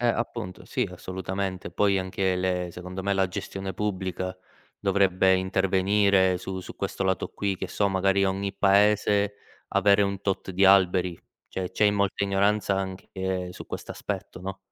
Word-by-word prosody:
Eh, 120 - +1
appunto, 115 -5 -3
sì, - - -1
assolutamente. 95 0 -4
Poi 100 +2 +2
anche 95 0 0
le 90 -1 -1
secondo 90 +2 -7
me 100 +1 0
la 95 -1 +2
gestione 95 +1 -5
pubblica 95 -2 -3 0.4
dovrebbe 95 -1 +3
intervenire 95 0 +2
su 95 +1 -5
su - - -10
questo 95 - -3
lato 95 0 0
qui, 100 -2 -2
che - - -5
so, 100 - +1
magari 95 0 +2
ogni 95 +1 -1
Paese 100 +1 +3 0.3
avere 100 +1 +4
un 100 -1 -1
tot 95 -1 -2
di 95 +2 +2
alberi. 90 -2 +4 0.3
Cioè 95 -1 -4
c'è 105 - +1
i 105 - +5
molta 100 0 0
ignoranza 100 0 +2
anche 95 -1 -3
su - - -10
questo - - -6
aspetto, - - -5
no? 95 +1 -5
95 Hz, 160 wpm, -26 LUFS, 95-100 Hz, 0.4 s, i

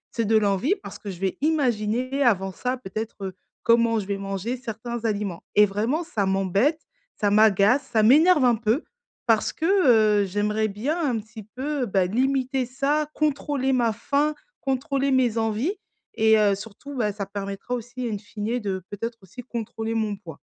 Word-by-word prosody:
c'est 230 - 0
de 220 +1 +4
l'envie 205 - +2
parce - - -9
que 205 - -7
je 180 -2 -7
vais 190 -1 -1
imaginer, 255 -3 0
avant 195 -6 +2
ça, 250 +7 -3
peut-être, 220 0 -6
heu, 190 -1 -6 0.3
comment 230 -1 +4
je 195 - -5
vais 200 0 -2
manger 195 +5 -3
certains 235 -1 -6
aliments 205 -5 -2
et 210 - +7
vraiment, 225 - -1
ça 210 - -1
m'embête, 195 - +1 0.4
ça 205 -1 +1
m'agace, 215 +4 +5
ça 220 -2 +3
m'énerve 295 +4 +6
un 240 -2 +5
peu. 225 +7 0 0.4
Parce 225 -3 +2
que, 320 - -3 0.6
heu, - - +1
j'aimerais 210 +3 0
bien, 255 - -2
un 235 - 0
petit 220 +1 -11
peu, 260 +5 -3
bah, 190 -2 +2
limiter 260 +4 0
ça, 285 +4 0
contrôler 285 -3 0
ma 235 -3 +2
faim, 290 +6 0 0.3
contrôler 275 +1 0
mes 250 -4 +2
envies 225 - 0 0.4
et 220 0 +5
heu, 205 -2 +4
surtout, 225 +8 -10
bah, 215 -4 0
ça 200 -1 -4
permettra 200 +4 -5
aussi, 245 +1 -4
in 210 - -2
fine, 220 +3 -3
de, 190 -4 -3
peut-être, 230 +3 -4
aussi, 195 +7 -10
contrôler 225 -1 -4
mon 215 -2 0
poids. 165 -7 -11
225 Hz, 175 wpm, -24 LUFS, 205-260 Hz, 0.6 s, et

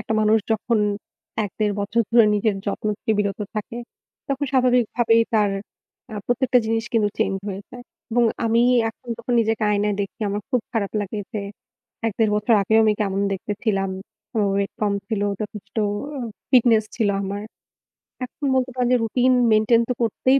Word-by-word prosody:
একটা 220 - -3
মানুষ 215 +1 +4
যখন 220 +1 0 0.7
১-১.৫ 205 0 -1
বছর 220 +4 +1
ধরে 235 -2 +7
নিজের 210 0 +1
যত্ন 205 +1 -2
থেকে 220 - 0
বিরত 200 0 -1 0.2
থাকে 230 +3 -4 0.5
তখন 275 +1 -1
স্বাভাবিকভাবেই 245 -2 +3
তার, 210 -2 +3 0.6
আ - - -5
প্রত্যেকটা 250 +1 +3
জিনিস 225 0 0
কিন্তু 215 -3 +3
change 195 0 0
হয়ে 195 0 -5
যায়। 245 0 -10 0.3
এবং 240 0 +4 0.2
আমি 230 +1 +3 0.3
এখন 240 - -22
যখন 235 +1 -4
নিজেকে 225 0 0
আয়নায় 205 0 +1
দেখি 200 +4 -8
আমার 205 +1 -2
খুব 250 -3 +2
খারাপ 210 -4 -1
লাগে 205 +1 -4
যে 210 - -2 0.7
১-১.৫ 220 0 +1
বছর 215 +2 +3
আগেও 220 +3 +3
আমি 215 - +4
কেমন 195 -1 0
দেখতে 195 +2 -3
ছিলাম। 195 -3 +1 0.5
ও - - +3 0.2
weight 200 +1 -1
কম 205 -1 +2 0.2
ছিল, 215 -3 -1 0.2
যথেষ্ট 210 -1 -7
অ - - -1 0.6
fitness 230 -4 +5
ছিল 220 -4 +2
আমার। 200 +1 -4 0.8
এখন 280 +3 -8
বলতে 255 0 +1
পারেন 250 -1 +1
যে - - +5
routine 250 +3 +3 0.2
maintain 220 +2 +4
তো - - +2
করতেই 260 +4 +2
220 Hz, 170 wpm, -22 LUFS, 205-240 Hz, 0.8 s, ধরে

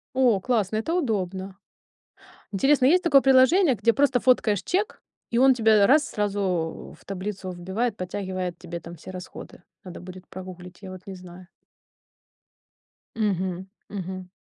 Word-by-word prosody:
О, 250 -6 +4
классно, 215 -2 0
это 225 +10 -2
удобно. 195 - -2 1.0
Интересно, 270 +7 +3
есть 355 +6 +4
такое 285 -6 +5
приложение, 270 +5 +5
где 230 +1 +2
просто 270 -1 +2
фоткаешь 220 -6 +2
чек, 400 +4 -2 0.3
и 235 - +1
он 265 +1 +6
тебе 220 -3 +4
раз 300 +4 +4
сразу 195 -5 -2
в - - -22
таблицу 195 0 -5
вбивает, 190 +6 -3
подтягивает 185 -2 -4
тебе 170 -1 -7
там 170 +1 -10
все 165 - -11
расходы. 180 -1 -10 0.2
Надо 180 -2 -9
будет 185 +1 -11
прогуглить, 180 -1 -10
я 190 - -8
вот 185 -1 -9
не 195 - -7
знаю. 180 0 -12 1.7
Мгм 190 -4 -1 0.2
мгм. 185 -2 -6
195 Hz, 140 wpm, -25 LUFS, 185-245 Hz, 1.7 s, он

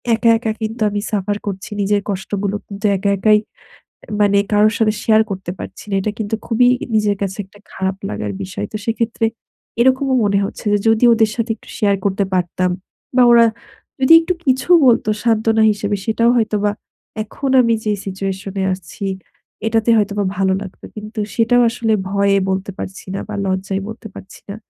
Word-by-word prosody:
একা, 230 +1 +2
একা 225 -1 -2
কিন্তু 220 +1 -4
আমি 205 0 -2
সাফার 205 0 -1
করছি 195 -1 -5
নিজের 205 +1 +1
কষ্টগুলো। 200 +1 -2
কিন্তু 200 +1 -7
একা, 200 +2 -1
একাই 210 +2 +4 0.8
মানে 200 -1 +4
কারোর 210 +2 +4
সাথে 215 -1 +2
শেয়ার 220 -1 +5
করতে 190 -2 -4
পারছি - - -8
না। - - -1
এটা 205 +2 -2
কিন্তু 215 0 -2
খুবই 245 +1 +3 0.3
নিজের 210 -1 +2
কাছে 195 -1 -2
একটা 195 +2 -20
খারাপ 190 0 -2
লাগার 105 0 -4
বিষয়। 95 +2 -5
তো - - -3
সেক্ষেত্রে 225 0 -1 0.5
এরকমও 260 +2 +3
মনে 200 -1 +2
হচ্ছে - - -7
যে 205 - +3
যদি 225 +2 +3
ওদের 220 -1 +3
সাথে 230 0 -2
একটু - - -20
শেয়ার 200 -2 +2
করতে 200 0 +1
পারতাম 180 0 0 0.5
বা 255 - +6
ওরা 235 -1 +7 0.5
যদি 260 +4 +5
একটু 360 +2 -1
কিছু 260 +3 +1 0.2
বলত 235 -3 +4 0.2
সান্ত্বনা 225 -1 +2
হিসেবে, 205 0 -1
সেটাও 230 +1 +2
হয়তোবা 210 -2 +1 0.5
এখন 270 +5 -4
আমি 230 -2 +3
যে 210 - +1
সিচুয়েশনে 195 0 -4
আছি 185 +2 -8 0.6
এটাতে 225 +1 +2
হয়তোবা 205 -1 0
ভালো 190 -1 +2
লাগত। 190 - -11
কিন্তু 215 +1 -6
সেটাও 245 +1 +3
আসলে 230 -1 -1 0.2
ভয়ে 200 0 +2
বলতে 190 +1 -2
পারছি 190 +1 -7
না - - -3
বা 215 - -5
লজ্জায় 190 +1 -2
বলতে 220 +1 -9
পারছি 190 - -12
না। 200 - -5
210 Hz, 175 wpm, -18 LUFS, 195-225 Hz, 0.8 s, ওরা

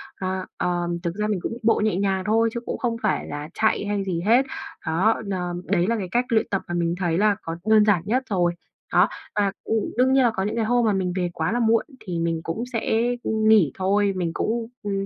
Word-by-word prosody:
À, 185 0 -3
ờm, 175 -2 -1
thực 170 +1 -2
ra 210 0 -1
mình 205 -4 0
cũng 230 - -3
bộ 225 - +3
nhẹ 215 -4 +1
nhàng 190 -1 0
thôi 225 +2 +3
chứ 235 - -2
cũng - - -3
không 235 -2 -1
phải - - 0
là 145 +1 -6
chạy 220 -1 +1
hay 205 -1 -1
gì 175 -3 -2
hết, 245 +5 +5 0.4
đó, 185 +9 +2
đ 200 - -3
ờm, 175 -1 -3
đấy 180 -1 +1
là 230 - +1
cái 190 -4 -3
cách 245 +1 +2
luyện 225 -2 +2
tập 195 - 0
mà 175 - -4
mình 170 0 0
thấy 175 -2 0
là 210 0 +3
có 165 0 -5
đơn 215 -1 +6
giản 200 -6 +3
nhất 255 +5 +1
rồi, 175 -3 +1 0.4
đó. - - +5 0.3
Và, 200 -2 +2
ừm, 220 -2 -1
đương 260 +1 +4
nhiên 265 -1 +5
là 235 - +4
có 190 - -1
những 210 - -2
cái 225 -2 0
hôm 240 0 +2
mà 210 - +3
mình 185 -2 -1
về 180 -1 0
quá 160 +6 -1
là 240 - 0
muộn 225 -1 +3
thì 175 -3 -4
mình 165 -1 0
cũng 190 +8 -3
sẽ, 225 0 +1 0.2
ừm, 220 0 0
nghỉ 205 -11 +5
thôi, 200 +1 +1
mình 175 -3 -1
cũng, 230 0 -1 0.2
ừm, 195 -1 -2
200 Hz, 250 wpm, -24 LUFS, 175-220 Hz, 0.4 s, đơn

